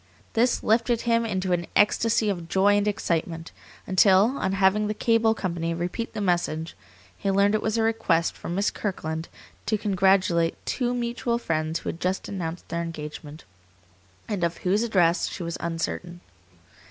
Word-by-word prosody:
This 240 +2 +2
lifted 230 +1 +2
him 230 -1 +1
into 190 -3 -2
an 175 -1 -1
ecstasy 220 +1 +3
of 175 -4 -4
joy 200 +2 +4
and 205 0 +1
excitement, 170 -5 -2 0.3
until, 195 +5 +4
on 190 - 0
having 195 +2 +3
the 210 - -2
cable 225 -1 +2
company 170 -4 -2
repeat 180 +7 -4
the - - -4
message, 175 -4 -1 0.4
he 200 - -3
learned 200 +1 +3
it 215 - +1
was 220 +1 -1
a 225 - +2
request 185 -7 +1
from 170 - -5
Miss 200 +2 +1
Kirkland 160 -5 -4 0.4
to 215 - +2
congratulate 190 -4 +2
two 245 -1 -1
mutual 235 0 -1
friends 160 -6 -2
who - - -4
had 165 - -6
just 185 +2 -2
announced 175 -3 -5
their 170 0 -2
engagement, 150 -2 -7 0.8
and 200 -5 -2
of 170 0 0
whose 195 +4 +3
address 180 -7 +2
she 180 - -6
was 170 0 -4
uncertain. 170 +1 -4
190 Hz, 165 wpm, -25 LUFS, 170-215 Hz, 0.8 s, joy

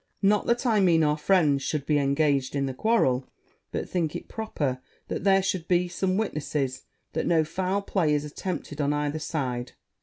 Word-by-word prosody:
Not 205 +1 +3
that 240 +2 +1
I 225 -4 +3
mean 170 -4 +4
our 150 0 +3
friends 150 -3 +3
should 145 0 -2
be 150 0 +2
engaged 140 -1 +1
in 140 -1 +1
the 135 - -3
quarrel; 135 - +2 0.4
but - - -3
think 165 -4 -1
it - - -6
proper 145 - -3 0.3
that - - -3
there 195 -1 +4
should 185 -3 -2
be 180 0 +2
some 185 +1 -1
witnesses 150 -9 -2 0.3
that - - -1
no 165 -2 +4
foul 190 +5 -1
play 165 -7 +1
is 145 0 -1
attempted 150 -1 -5
on 145 0 +1
either 150 +1 -1
side. 130 -6 -3
155 Hz, 185 wpm, -26 LUFS, 140-190 Hz, 0.4 s, mean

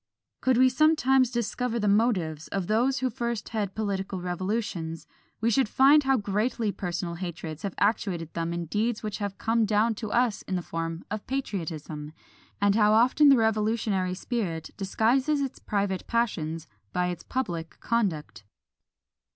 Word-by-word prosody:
Could 260 -2 +3
we 260 +1 +6
sometimes 265 -2 +4
discover 240 0 -2
the 210 - 0
motives 190 -8 +1
of 195 -2 -2
those 240 +7 +2
who 260 - +1
first 235 -2 -3
head 205 -4 -3
political 195 -3 -2
revolutions, 180 -2 -3 0.4
we 230 +1 +2
should 260 -1 +2
find 280 +4 +5
how 270 0 +4
greatly 210 +1 0
personal 175 -2 -3
hatreds 165 -3 -6
have 200 -3 -4
actuated 195 -6 0
them 165 0 -2
in 170 0 -3
deeds 215 +7 -1
which 210 -1 -4
have 200 -1 -4
come 225 0 +1
down 215 +2 +2
to 215 0 -6
us 240 -4 +2
in 190 - -1
the 180 - -2
form 165 0 -4
of 215 -1 -4
patriotism, 160 - -4 0.5
and 200 0 +3
how 210 0 +4
often 255 +6 +5
the 275 - +7
revolutionary 215 -4 +1
spirit 185 -7 -3
disguises 245 +9 +1
its 275 -2 -3
private 200 -2 -2
passions 165 -9 -1 0.2
by 180 0 0
its 175 - -5
public 170 -11 -4
conduct. 195 - -1
210 Hz, 155 wpm, -27 LUFS, 180-235 Hz, 0.5 s, the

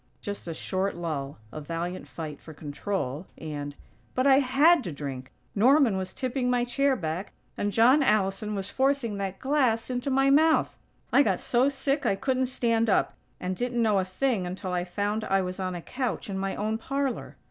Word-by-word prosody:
'" - - -38
(Just 205 -3 -6
a 165 - -3
short 190 +3 -2
lull, 150 -5 -4
a 155 - -6
valiant 170 +4 -4
fight 155 -3 -7
for 160 - -11
control, 150 0 -4
and) 145 -2 -5 0.4
"But 255 - +1
I 270 -1 +7
had 285 +4 +4
to 175 - -3
drink!! 135 -3 -6 0.2
Norman 250 +1 +5
was 190 -1 -3
tipping 255 -1 -2
my 245 -1 +2
chair 275 +3 +2
back 170 0 -4 0.2
and 205 - -1
John 245 +7 +5
Allison 210 -3 +1
was 195 0 -3
forcing 265 -5 +1
that 195 -1 -3
glass 260 -4 +1
into 250 +2 -2
my 270 +1 +3
mouth! 315 +3 +4 0.4
I - - +7
got - - +2
so 255 +3 +2
sick 275 +1 -1
I - - +3
couldn't 260 +4 0
stand 230 -3 +1
up, - - +2 0.3
and 185 +1 -2
didn't 245 +3 -2
know 210 -3 +3
a - - +1
thing 185 +1 -1
until 185 0 -4
I 175 0 0
found 205 +4 -2
I 195 0 +2
was 185 +1 -5
on 185 -1 -2
a 170 - -6
couch 250 -4 -3
in 190 - -3
my 195 0 -2
own 215 +2 -1
parlor." 275 +1 -3
210 Hz, 195 wpm, -27 LUFS, 180-260 Hz, 0.4 s, I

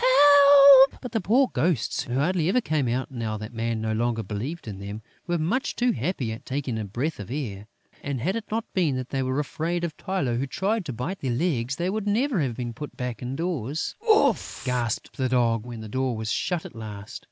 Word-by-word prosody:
Help!" 285 - +8
But 250 - -7
the 225 -2 0
poor 250 +8 +3
Ghosts, 145 -2 0
who 125 - -4
hardly 165 +4 +1
ever 250 - +3
come 155 - 0
out 125 +3 -2
now 115 -4 -3
that 110 +2 -8
Man 115 0 -2
no 110 0 -1
longer 115 0 0
believes 115 - -5
in 100 -3 -6
them, 100 +2 -7 0.2
were 175 0 +1
much 190 - -1
too 245 0 +2
happy 135 - -2
at 110 - -7
taking 130 -4 -3
a 110 - -3
breath 125 +10 -3
of 105 - -7
air; 110 -7 -5 0.3
and, 140 -2 -3
had 180 - -1
it 225 -2 -4
not 220 +1 -2
been 165 -8 +1
that 130 -1 -4
they 135 - -1
were 130 +1 -1
afraid 165 +4 -2
of 165 -3 -3
Tylô, 160 -12 -1
who 135 - -2
tried 200 +7 -1
to 140 - -4
bite 125 - -4
their 135 - -3
legs, 125 -1 0
they 175 +4 -1
would 210 0 -3
never 225 - +1
have 125 -5 -1
been 120 -1 -4
put 150 +4 -8
back 125 -4 -4
indoors. 140 +1 -3 0.2
"Oof!" 430 - +2
gasped 120 -3 -2
the 130 -1 0
Dog, 120 -2 +1
when 120 -2 -7
the 110 - -7
door 130 +1 -1
was 110 0 -3
shut 175 -1 -1
at - - -10
last. 105 -2 -8
135 Hz, 220 wpm, -25 LUFS, 115-185 Hz, 0.3 s, Help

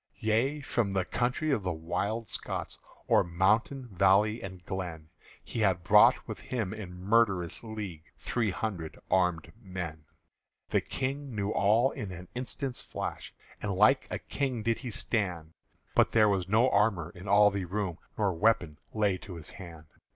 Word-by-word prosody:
Yea, 120 +7 +1
from 120 -7 0
the 95 -2 +1
country 125 +9 0
of 135 - +1
the 90 -1 -1
Wild 100 +7 -2
Scots, - - -4 0.3
O'er - - +5
mountain, 105 +9 +1
valley, 100 +4 +3
and 95 -2 -8
glen, 85 -5 -5 0.3
He - - -5
had 95 -5 +2
brought 85 - +6
with - - -6
him 110 -6 -3
in 105 -5 -7
murderous 95 -1 +1
league 105 -8 -6
Three 115 -3 -1
hundred 90 -5 -4
armèd 90 -3 +2
men. 85 -6 -6 0.6
The - - +2
King 135 -1 -4
knew 100 0 -1
all 110 +7 +3
in 100 -3 -6
an 90 0 -9
instant's 130 +1 -4
flash, - - -5 0.3
And 105 -2 -1
like 110 +8 +4
a - - -2
King 130 -5 -3
did 115 0 +1
he 130 - -5
stand; 90 -8 -2 0.4
But - - +3
there 110 -2 +5
was 95 -2 0
no 110 +5 +4
armour 100 -5 +2
in 90 +3 -10
all 105 +1 +6
the 100 -1 -2
room, 95 -2 -3 0.2
Nor 100 -3 +1
weapon 85 -5 +1 0.2
lay 100 -4 +2
to 95 - -9
his 80 -2 -8
hand. 85 -4 -10
100 Hz, 165 wpm, -30 LUFS, 90-115 Hz, 0.6 s, brought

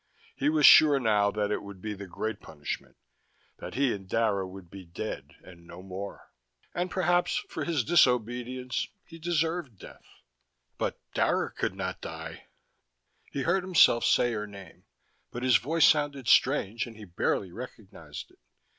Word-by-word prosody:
He 145 - +1
was 155 -1 +4
sure, 150 -3 +8
now, 105 -4 +3
that 105 0 -1
it - - -1
would 100 -2 -10
be 105 +2 -4
the 100 -1 -8
great 110 +5 -4
punishment, 75 -2 -7 0.6
that - - -8
he 135 -2 +2
and 95 -2 -8
Dara 105 -4 +1
would 95 -1 -11
be 95 +2 -11
dead 90 +5 -7
and 85 -2 -15
no 90 +2 -11
more. 95 +1 -8 0.4
And 180 +1 -2
perhaps, 175 -1 +1
for - - -4
his 160 -7 0
disobedience, 125 -3 +1 0.2
he 165 -1 -13
deserved 165 - -1
death. - - -15 0.6
But - - -2
Dara - - +1
could - - -3
not - - -4
die. - - -8 0.8
He 140 - -2
heard 180 +5 +2
himself 170 -10 +5
say 120 -1 +3
her 105 -1 -3
name, 100 -2 -13 0.4
but 120 - -6
his 130 -2 +5
voice 160 +6 +2
sounded 145 -4 +1
strange 120 -4 +3
and 115 -2 -12
he 110 - -10
barely 90 +1 -1
recognized 115 -1 -10
it. - - -26
115 Hz, 160 wpm, -28 LUFS, 100-145 Hz, 0.8 s, sure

